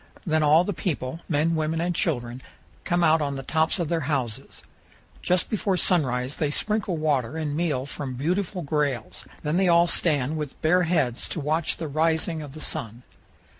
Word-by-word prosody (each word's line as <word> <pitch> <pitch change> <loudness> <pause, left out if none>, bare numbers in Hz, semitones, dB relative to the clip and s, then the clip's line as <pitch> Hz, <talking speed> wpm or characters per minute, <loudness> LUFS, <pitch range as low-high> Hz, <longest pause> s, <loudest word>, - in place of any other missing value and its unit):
Then 160 -2 +2
all 155 +3 +5
the 205 - -2
people, 160 -4 -3
men, 160 +1 +2
women, 160 0 -1
and 175 +1 0
children, 125 -7 -1 0.4
come 175 0 +1
out 160 -1 +4
on 140 -1 -1
the 135 - -5
tops 160 +5 +1
of 170 -3 -1
their 165 +1 0
houses. 125 -7 -3 0.6
Just 180 0 +1
before 200 -3 0
sunrise 130 -8 +2
they 150 - 0
sprinkle 205 +2 0
water 150 -3 0
and 150 -2 -2
meal 150 -6 -1
from 140 -2 -6
beautiful 180 +6 -1
grails; 140 -6 -2 0.2
then 150 +3 0
they 190 0 +3
all 170 0 +5
stand 155 -4 +1
with 150 -3 -5
bare 180 +4 +4
heads 135 -9 0
to - - -3
watch 155 +2 0
the 165 - -4
rising 160 +2 0
of 145 -3 -9
the 155 - -8
sun. 115 -2 -3
155 Hz, 180 wpm, -25 LUFS, 140-170 Hz, 0.6 s, all